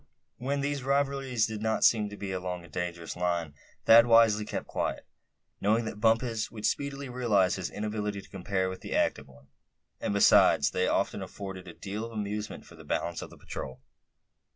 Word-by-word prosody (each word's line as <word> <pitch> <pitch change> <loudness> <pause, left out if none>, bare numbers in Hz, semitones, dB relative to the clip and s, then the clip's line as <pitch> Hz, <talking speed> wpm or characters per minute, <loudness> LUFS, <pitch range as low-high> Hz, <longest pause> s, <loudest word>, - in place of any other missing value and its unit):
When 140 +3 -1
these 140 0 -1
rivalries 135 -3 +1
did 110 -1 -5
not 110 0 0
seem 105 -3 +4
to 105 - -9
be 100 -1 -5
along 90 -1 -4
a - - -15
dangerous 85 0 -4
line 85 -3 -1 0.3
Thad 115 +1 +8
wisely 115 -2 +5
kept - - -4
quiet, - - -3 0.6
knowing 110 +3 +2
that 105 -1 -6
Bumpus 115 0 +1
would 110 -2 -6
speedily 140 -1 -1
realize 115 -7 +2
his 95 -3 -3
inability 105 -1 -3
to - - -16
compare 95 0 -1
with 95 0 -6
the - - -4
active 70 - +1
one; 65 +1 -19 0.5
and - - -2
besides 75 -7 +5
they 90 0 +1
often - - 0
afforded 95 -2 -7
a 85 - -8
deal 105 +2 -5
of 115 0 -7
amusement 105 0 -4
for - - -15
the - - -13
balance 85 0 -2
of - - -7
the - - -15
patrol. 65 - -7
105 Hz, 185 wpm, -29 LUFS, 95-115 Hz, 0.6 s, Thad